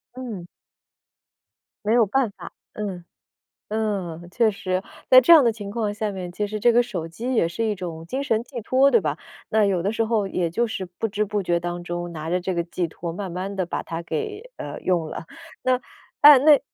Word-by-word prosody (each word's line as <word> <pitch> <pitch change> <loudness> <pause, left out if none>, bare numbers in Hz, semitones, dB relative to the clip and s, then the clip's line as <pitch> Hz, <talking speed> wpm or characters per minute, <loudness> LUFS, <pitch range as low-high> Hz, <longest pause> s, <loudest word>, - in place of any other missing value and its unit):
嗯。 230 -9 -6 1.4
没 215 - +2
有 235 -2 +5
办 245 +1 +1
法。 - - -10 0.2
嗯。 195 -5 -5 0.7
嗯， 195 -6 -3
确 230 +2 +3
实。 185 -1 -2 0.3
在 255 0 +10
这 260 - +6
样 320 -4 +10
的 235 - +4
情 205 -2 -7
况 215 -2 -1
下 210 -1 -3
面， 180 -2 -5
其 205 +3 -2
实 210 0 -5
这 240 - +5
个 240 +1 +4
手 180 -9 -5
机 240 +10 -4
也 170 -7 +3
是 225 +7 -3
一 210 - 0
种 165 -3 -7
精 265 +9 -3
神 230 -5 0
寄 250 -3 -7
托， 265 +5 +3
对 230 - +6
吧？ 150 -2 -2 0.3
那 220 -1 +3
有 185 -3 +1
的 195 - 0
时 225 +1 0
候 215 -3 0
也 180 -2 -1
就 235 +7 0
是 195 -3 -4
不 180 +5 -4
知 210 +1 0
不 205 0 -2
觉 175 -2 +1
当 175 0 -4
中 175 0 -4
拿 160 0 -5
着 180 - +1
这 185 +1 -2
个 170 - 0
寄 170 +1 -2
托， 165 +1 -6
慢 185 +1 -5
慢 190 +3 -4
地 185 -2 -1
把 - - -3
它 165 0 -5
给， 435 - -5
呃， - - -6
用 170 -4 +1
了。 - - -6 0.4
那 255 0 +2 0.4
呃， 290 -2 +10
那 295 +1 +6
205 Hz, 235 characters per minute, -24 LUFS, 175-235 Hz, 1.4 s, 在